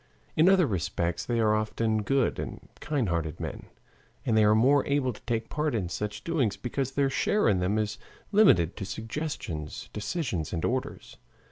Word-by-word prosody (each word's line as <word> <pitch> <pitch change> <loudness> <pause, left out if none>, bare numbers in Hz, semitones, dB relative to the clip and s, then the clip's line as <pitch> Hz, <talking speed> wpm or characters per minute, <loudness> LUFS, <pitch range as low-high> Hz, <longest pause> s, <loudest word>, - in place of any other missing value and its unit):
In 165 +4 +5
other 190 -3 +5
respects 85 - -1
they 120 -1 0
are 110 -1 +3
often 110 0 0
good 135 +4 +1
and - - -6
kind 140 -6 -1
hearted 80 -3 -2
men, - - -6 0.6
and 110 - +2
they 110 - +5
are 105 0 +5
more 135 +5 +4
able 140 -3 +1
to - - -14
take 115 -1 -1
part 150 -3 -1
in 95 -6 -1
such 105 +4 -4
doings 140 -12 0
because 135 +2 -3
their 140 -1 +1
share 210 +9 +2
in 100 -4 +3
them 95 +4 +1
is 105 -1 -2 0.3
limited 100 - +5
to - - -4
suggestions, 110 - -5
decisions, 105 - -3
and 80 - -1
orders. 130 +1 -3
110 Hz, 175 wpm, -28 LUFS, 100-140 Hz, 0.6 s, In